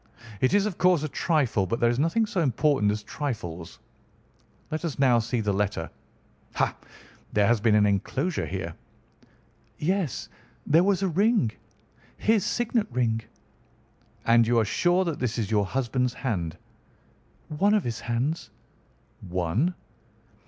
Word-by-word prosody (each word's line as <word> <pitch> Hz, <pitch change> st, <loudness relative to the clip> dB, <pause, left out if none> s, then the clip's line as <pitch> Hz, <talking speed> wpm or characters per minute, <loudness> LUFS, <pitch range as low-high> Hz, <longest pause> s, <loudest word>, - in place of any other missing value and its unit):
It 130 Hz, +9 st, +2 dB
is, 205 Hz, 0 st, +3 dB
of 210 Hz, -5 st, -4 dB
course, 180 Hz, -4 st, +4 dB
a -, -, -1 dB
trifle, 140 Hz, -, +1 dB
but 115 Hz, -, -2 dB
there 120 Hz, 0 st, +3 dB
is 120 Hz, -, -2 dB
nothing 165 Hz, +9 st, +2 dB
so 190 Hz, -4 st, -1 dB
important 135 Hz, -5 st, +2 dB
as 105 Hz, 0 st, -4 dB
trifles. 105 Hz, -, -5 dB, 0.9 s
Let 155 Hz, +2 st, -3 dB
us 165 Hz, -5 st, -3 dB
now 130 Hz, -4 st, +4 dB
see 115 Hz, +1 st, -1 dB
the 105 Hz, -2 st, 0 dB
letter. 100 Hz, -4 st, -2 dB, 0.6 s
Ha! -, -, +1 dB, 0.6 s
there 105 Hz, -1 st, +3 dB
has 115 Hz, 0 st, +2 dB
been 110 Hz, -1 st, +4 dB
an 105 Hz, -1 st, +5 dB
enclosure 130 Hz, -, -1 dB
here!" 95 Hz, -3 st, -4 dB, 1.0 s
"Yes, 175 Hz, -, -1 dB, 0.4 s
there 165 Hz, +4 st, +4 dB
was 195 Hz, -1 st, +1 dB
a -, -, +2 dB
ring. 195 Hz, -, +2 dB, 0.7 s
His 220 Hz, -3 st, +2 dB
signet 235 Hz, -2 st, 0 dB
ring." 115 Hz, -2 st, 0 dB, 1.0 s
"And 115 Hz, 0 st, +5 dB
you 120 Hz, 0 st, +3 dB
are 115 Hz, -, +3 dB
sure 175 Hz, -, +2 dB
that 165 Hz, -4 st, -3 dB
this 125 Hz, -2 st, -2 dB
is 110 Hz, -3 st, -2 dB
your 105 Hz, -3 st, +2 dB
husband's 125 Hz, +1 st, -1 dB
hand?" 90 Hz, -, -3 dB, 0.9 s
"One 200 Hz, +8 st, +2 dB
of 210 Hz, -, +1 dB
his 115 Hz, -2 st, -3 dB
hands." 125 Hz, +8 st, -2 dB, 0.8 s
"One?" 95 Hz, -, 0 dB
125 Hz, 145 wpm, -26 LUFS, 105-170 Hz, 1.0 s, an